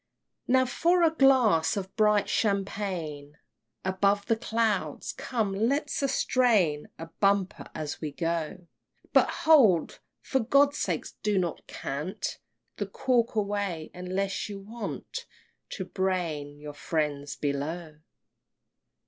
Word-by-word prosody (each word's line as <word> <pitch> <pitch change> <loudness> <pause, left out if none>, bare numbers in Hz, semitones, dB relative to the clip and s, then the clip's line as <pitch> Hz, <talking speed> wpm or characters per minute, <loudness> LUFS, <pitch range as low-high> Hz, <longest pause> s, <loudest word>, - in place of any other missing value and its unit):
XI. - - +1
Now 260 0 +5
for 345 +7 +2
a 325 -1 +4
glass 250 - +4
of 190 -1 -5
bright 210 -2 +3
champagne 190 -9 -2 0.5
Above 200 +2 +2
the 225 - +2
clouds! 225 -1 -1
Come, 220 -6 -2
let 270 +9 +1
us 275 - +1
drain 205 - +3
A 165 - -6
bumper 200 -1 +1
as 150 -2 -5
we 155 -2 -3
go! 165 +4 -3 0.5
But - - +5 0.2
hold! 240 - +5 0.2
for 265 - 0
God's 280 +4 +3
sake - - -1 0.2
do 210 -1 +1
not 175 -3 -2
cant 150 +7 -4 0.4
The 205 - -2
cork 235 +3 +1
away 200 -6 -2
unless 190 +3 -2
you 200 -1 -6
want 220 +2 -6 0.4
To 190 - -5
brain 170 -7 -2
your 150 0 -8
friends 145 -2 -2
below. 150 +3 -3
195 Hz, 125 wpm, -28 LUFS, 165-225 Hz, 0.5 s, Now